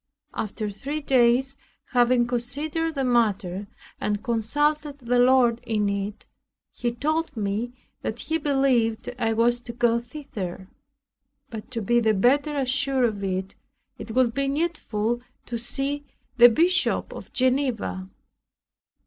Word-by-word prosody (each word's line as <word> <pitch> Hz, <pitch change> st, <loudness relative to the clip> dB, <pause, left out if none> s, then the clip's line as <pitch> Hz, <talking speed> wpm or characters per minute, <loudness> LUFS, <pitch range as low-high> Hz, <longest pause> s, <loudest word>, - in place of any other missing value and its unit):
After 215 Hz, 0 st, -3 dB
three 280 Hz, +9 st, -4 dB
days, 260 Hz, -1 st, +3 dB, 0.4 s
having 245 Hz, -1 st, +4 dB
considered 290 Hz, +7 st, -2 dB
the 270 Hz, -, 0 dB
matter, 205 Hz, -6 st, +1 dB, 0.3 s
and 210 Hz, 0 st, -1 dB
consulted 290 Hz, +6 st, 0 dB
the 245 Hz, -2 st, 0 dB
Lord 245 Hz, -2 st, +4 dB
in 210 Hz, -2 st, 0 dB
it, 200 Hz, +1 st, -4 dB, 0.5 s
he 240 Hz, -1 st, -2 dB
told 310 Hz, +3 st, -1 dB
me 215 Hz, +4 st, -2 dB, 0.3 s
that -, -, -3 dB
he 320 Hz, 0 st, -1 dB
believed 260 Hz, -6 st, +1 dB
I 225 Hz, -2 st, +1 dB
was 235 Hz, +2 st, +2 dB
to 240 Hz, -, -7 dB
go 235 Hz, 0 st, +2 dB
thither; 210 Hz, -9 st, -7 dB, 0.8 s
but 220 Hz, +1 st, -7 dB
to 230 Hz, -4 st, -4 dB
be 240 Hz, +4 st, +3 dB
the 220 Hz, -2 st, +2 dB
better 285 Hz, +8 st, +2 dB
assured 270 Hz, -1 st, +1 dB
of 210 Hz, -4 st, -2 dB
it, 190 Hz, 0 st, -2 dB, 0.5 s
it -, -, -8 dB
would 255 Hz, -3 st, +3 dB
be 275 Hz, +2 st, 0 dB
needful 245 Hz, -7 st, -1 dB, 0.2 s
to 235 Hz, -1 st, -4 dB
see 275 Hz, +4 st, -1 dB, 0.3 s
the 240 Hz, -1 st, +9 dB
Bishop 345 Hz, +10 st, +2 dB
of -, -, -10 dB
Geneva. 255 Hz, -8 st, 0 dB
240 Hz, 130 wpm, -25 LUFS, 225-275 Hz, 0.8 s, the